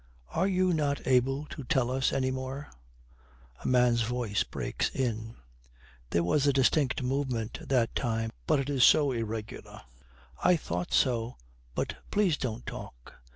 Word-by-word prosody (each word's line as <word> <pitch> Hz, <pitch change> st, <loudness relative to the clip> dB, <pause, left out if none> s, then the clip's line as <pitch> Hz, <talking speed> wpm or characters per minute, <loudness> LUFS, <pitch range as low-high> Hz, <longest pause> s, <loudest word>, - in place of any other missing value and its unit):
Are 185 Hz, +4 st, +1 dB
you 185 Hz, -1 st, +2 dB
not 145 Hz, -3 st, 0 dB
able 135 Hz, +3 st, +2 dB
to 145 Hz, -, -6 dB
tell 125 Hz, 0 st, +1 dB
us 130 Hz, 0 st, +1 dB
any 130 Hz, -1 st, 0 dB
more?' 130 Hz, +2 st, -5 dB, 0.9 s
A -, -, -2 dB
man's 125 Hz, -2 st, +4 dB
voice 115 Hz, -3 st, -1 dB
breaks -, -, -2 dB
in. 115 Hz, -3 st, -3 dB, 0.7 s
'There 85 Hz, +5 st, +1 dB
was 145 Hz, -, +2 dB
a -, -, +6 dB
distinct 135 Hz, 0 st, +2 dB
movement 125 Hz, -4 st, -2 dB
that 125 Hz, -4 st, +2 dB
time, 115 Hz, -2 st, -1 dB, 0.2 s
but 155 Hz, -3 st, +3 dB
it 135 Hz, -, -2 dB
is 135 Hz, -3 st, +2 dB
so 145 Hz, -3 st, +6 dB
irregular.' 115 Hz, -2 st, -5 dB, 0.6 s
'I 180 Hz, -, +6 dB
thought 90 Hz, -, -3 dB
so, 120 Hz, -2 st, +1 dB, 0.4 s
but -, -, -2 dB
please 200 Hz, -6 st, +2 dB
don't 120 Hz, -4 st, -4 dB
talk. -, -, -9 dB
130 Hz, 150 wpm, -29 LUFS, 115-140 Hz, 0.9 s, a